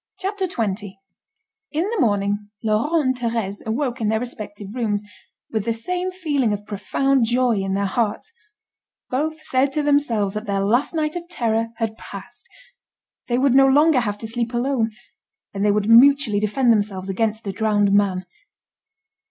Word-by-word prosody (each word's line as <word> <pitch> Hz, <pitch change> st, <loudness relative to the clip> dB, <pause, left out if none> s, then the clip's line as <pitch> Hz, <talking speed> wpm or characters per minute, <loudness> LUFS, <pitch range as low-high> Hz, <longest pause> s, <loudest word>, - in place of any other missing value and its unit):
CHAPTER 385 Hz, 0 st, -2 dB
XX 205 Hz, -, -3 dB, 0.8 s
In 315 Hz, +2 st, 0 dB
the 465 Hz, -, -1 dB
morning, 205 Hz, -4 st, 0 dB
Laurent 220 Hz, +7 st, +1 dB
and 260 Hz, -5 st, +2 dB, 0.2 s
Thérèse, 205 Hz, -4 st, -3 dB
awoke 250 Hz, +1 st, -2 dB
in 215 Hz, -, +1 dB
their 220 Hz, +1 st, +1 dB
respective 210 Hz, -4 st, -7 dB
rooms, 215 Hz, -4 st, -1 dB, 0.5 s
with 220 Hz, -2 st, -1 dB
the 230 Hz, -, +1 dB
same 360 Hz, +11 st, -3 dB
feeling 295 Hz, -, 0 dB
of 205 Hz, 0 st, -5 dB
profound 260 Hz, +5 st, +1 dB
joy 240 Hz, -1 st, +2 dB
in 195 Hz, 0 st, -1 dB
their 200 Hz, 0 st, 0 dB
hearts: 210 Hz, -, -2 dB, 0.8 s
both 310 Hz, +4 st, -2 dB
said 270 Hz, -2 st, +2 dB
to 300 Hz, -, 0 dB
themselves 245 Hz, -9 st, +1 dB
that 215 Hz, +1 st, -5 dB
their 200 Hz, -1 st, 0 dB
last 245 Hz, +10 st, +1 dB
night 305 Hz, 0 st, -1 dB
of 345 Hz, 0 st, -6 dB
terror 230 Hz, -8 st, 0 dB
had 225 Hz, -1 st, -3 dB
passed. -, -, -11 dB, 0.8 s
They 240 Hz, -, +1 dB
would 265 Hz, 0 st, +3 dB
no 270 Hz, 0 st, +6 dB
longer 295 Hz, +1 st, +5 dB
have 205 Hz, -4 st, -2 dB
to 225 Hz, -, -6 dB
sleep 235 Hz, +1 st, -2 dB
alone, 240 Hz, -2 st, +1 dB, 0.6 s
and 200 Hz, 0 st, -2 dB
they 210 Hz, -, +4 dB
would 205 Hz, 0 st, 0 dB
mutually 240 Hz, -2 st, +6 dB
defend 235 Hz, +4 st, +2 dB
themselves 205 Hz, -3 st, 0 dB
against 220 Hz, +3 st, -1 dB
the 195 Hz, -, -4 dB
drowned 205 Hz, -1 st, +2 dB
man. 195 Hz, -2 st, +2 dB
230 Hz, 165 wpm, -22 LUFS, 205-275 Hz, 0.8 s, no